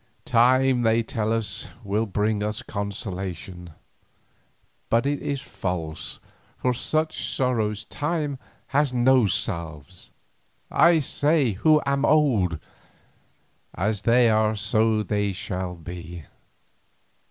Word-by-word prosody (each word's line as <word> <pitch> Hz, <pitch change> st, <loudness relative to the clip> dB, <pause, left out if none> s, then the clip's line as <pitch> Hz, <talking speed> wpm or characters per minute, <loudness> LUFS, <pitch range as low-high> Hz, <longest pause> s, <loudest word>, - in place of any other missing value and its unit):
Time, 130 Hz, +2 st, +4 dB
they 115 Hz, 0 st, +3 dB
tell 110 Hz, -3 st, -2 dB
us, 110 Hz, -1 st, -1 dB, 0.2 s
will 105 Hz, +2 st, -1 dB
bring 105 Hz, +2 st, 0 dB, 0.3 s
consolation, 95 Hz, -4 st, -5 dB, 1.2 s
but 115 Hz, +3 st, +2 dB
it 145 Hz, 0 st, -1 dB
is 140 Hz, -2 st, -3 dB
false, 90 Hz, -6 st, -4 dB, 0.4 s
for 125 Hz, -, 0 dB
such 155 Hz, +5 st, -2 dB
sorrows 110 Hz, -5 st, 0 dB
time 150 Hz, -3 st, -2 dB, 0.3 s
has 140 Hz, 0 st, +2 dB
no 125 Hz, -2 st, +4 dB
salves—I 85 Hz, -, -2 dB
say 145 Hz, -1 st, +2 dB
it 95 Hz, -, -7 dB
who 155 Hz, +6 st, +5 dB
am 140 Hz, 0 st, 0 dB
old—as 105 Hz, -, -2 dB
they 120 Hz, +1 st, +4 dB
are 110 Hz, 0 st, +2 dB
so 110 Hz, 0 st, +1 dB
they 105 Hz, -2 st, -1 dB
shall 90 Hz, -1 st, -4 dB
be. 85 Hz, 0 st, -8 dB
110 Hz, 100 wpm, -24 LUFS, 95-130 Hz, 1.2 s, who